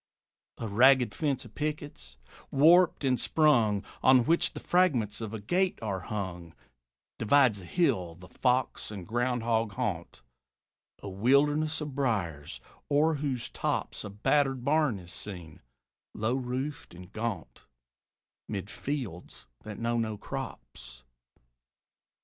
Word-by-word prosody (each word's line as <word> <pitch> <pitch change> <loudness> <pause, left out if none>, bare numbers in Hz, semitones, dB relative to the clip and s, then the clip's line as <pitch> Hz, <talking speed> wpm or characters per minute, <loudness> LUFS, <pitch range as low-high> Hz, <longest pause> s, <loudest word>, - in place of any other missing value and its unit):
A 115 - -4
ragged 125 +1 +5
fence 140 -4 -1
of - - -14
pickets, 145 - -5 0.3
warped 165 +4 +5
and 130 -2 +2
sprung, 120 -10 +3 0.2
On 130 -2 +5
which 165 +2 +2
the - - -6
fragments 130 - +1
of 110 -2 -5
a 110 - -5
gate 180 - 0
are 100 -3 -2
hung, 90 -4 -6 0.6
Divides 115 -3 +4
a - - -11
hill, 90 - 0
the 90 +2 -14
fox 125 +4 0
and 100 -4 -7
ground 120 +1 -1
hog 115 -2 0
haunt, 90 -4 -4 0.8
A - - -5
wilderness 145 +10 +2
of 150 -2 -5
briers; 100 - -2 0.3
o'er 150 +3 +3
whose 135 -5 -3
tops - - -2
A 105 - -6
battered 130 +5 +1
barn 150 -6 +2
is 90 -2 -10
seen, 90 -6 -9 0.5
low 110 +3 0
roofed 130 -2 -4
and 90 0 -13
gaunt, 110 -2 -5 0.8
'Mid 100 -1 -5
fields 125 - -5
that 110 -1 -9
know 115 0 -1
no 110 -2 -2
crops. 60 -9 -8
120 Hz, 130 wpm, -29 LUFS, 100-145 Hz, 0.8 s, ragged